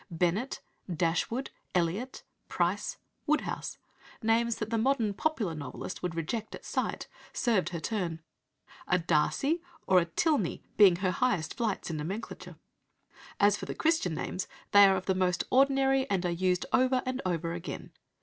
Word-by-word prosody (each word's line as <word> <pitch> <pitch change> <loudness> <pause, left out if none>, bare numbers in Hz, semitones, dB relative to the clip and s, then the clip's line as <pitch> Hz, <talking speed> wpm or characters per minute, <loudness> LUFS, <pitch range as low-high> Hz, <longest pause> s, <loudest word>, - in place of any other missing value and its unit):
Bennet, 180 +9 -1 0.3
Dashwood, 175 - 0 0.2
Elliot, 180 +9 -1 0.3
Price, - - 0 0.3
Woodhouse 305 +1 -1 0.5
names 230 +1 +2
that 215 0 -5
the 230 - +1
modern 230 -4 +2
"popular" 215 - -1
novelist 145 +4 -6
would 180 -2 -3
reject 210 +7 -3
at - - -13
sight, - - -2 0.3
served 225 -7 +1
her 170 - -4
turn, 175 -4 -2 0.7
a 180 - +3
Darcy 180 - +1 0.2
or 185 -1 +6
a 170 - +1
Tilney 220 - 0
being 195 -4 +7
her 185 +1 0
highest 180 -5 0
flights 215 -7 -2
in 160 - -3
nomenclature. 190 +9 -6 0.8
As 205 0 +5
for - - -7
the - - -4
Christian 315 - +1
names, 185 - -3 0.2
they 205 0 +9
are 195 - +4
of 185 0 -3
the 190 - +2
most 180 -1 +1
ordinary 270 0 +3
and 190 -2 0
are 175 - +1
used 180 +1 +1
over 255 0 +3
and 255 +1 -2
over 170 -2 -1
again. 170 +1 -6
195 Hz, 155 wpm, -30 LUFS, 175-250 Hz, 0.8 s, they